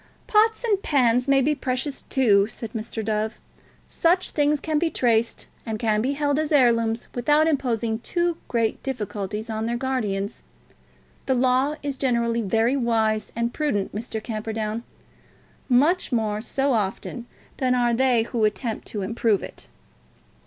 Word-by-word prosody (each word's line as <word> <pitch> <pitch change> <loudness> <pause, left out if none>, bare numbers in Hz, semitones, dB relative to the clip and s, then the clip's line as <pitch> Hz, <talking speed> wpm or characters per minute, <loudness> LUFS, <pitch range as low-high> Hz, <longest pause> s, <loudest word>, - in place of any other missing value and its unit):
"Pots 440 +2 +3
and 415 -5 +1
pans 250 -5 +2
may 275 -1 +4
be 300 +3 +2
precious, 265 0 -3
too," 205 -7 +3
replied 220 0 -7
Mr. 220 -1 -5
Dove. 215 0 -1 0.5
"Such 355 +2 +1
things 295 0 +2
can 310 +1 0
be 335 0 +1
traced, 230 -5 +1 0.2
and 220 -1 -3
can 215 -1 +1
be 265 +5 0
held 290 0 0
as 310 0 -2
heirlooms 230 -5 +3
without 295 +6 +3
imposing 235 -7 0
too 345 +6 -1
great 230 -2 0
difficulties 210 -4 -4
on 220 0 -3
their 235 +1 -1
guardians. 220 -6 -2 0.9
The 265 - +2
Law 260 +3 +2
is 280 -2 -3
generally 235 -3 +1
very 225 +5 +1
wise 225 -4 0
and 235 +1 -1
prudent, 215 -11 -1
Mr. 220 0 -5
Camperdown; 220 0 -3 0.9
much 295 +10 +3
more 215 -3 0
so 270 +3 0
often 225 +3 -2 0.3
than 255 -1 +1
are 240 -1 +2
they 245 -1 +3
who 230 -1 -2
attempt 215 +2 -1
to 205 -3 -4
improve 220 0 +1
it." - - -9
235 Hz, 150 wpm, -24 LUFS, 220-275 Hz, 0.9 s, may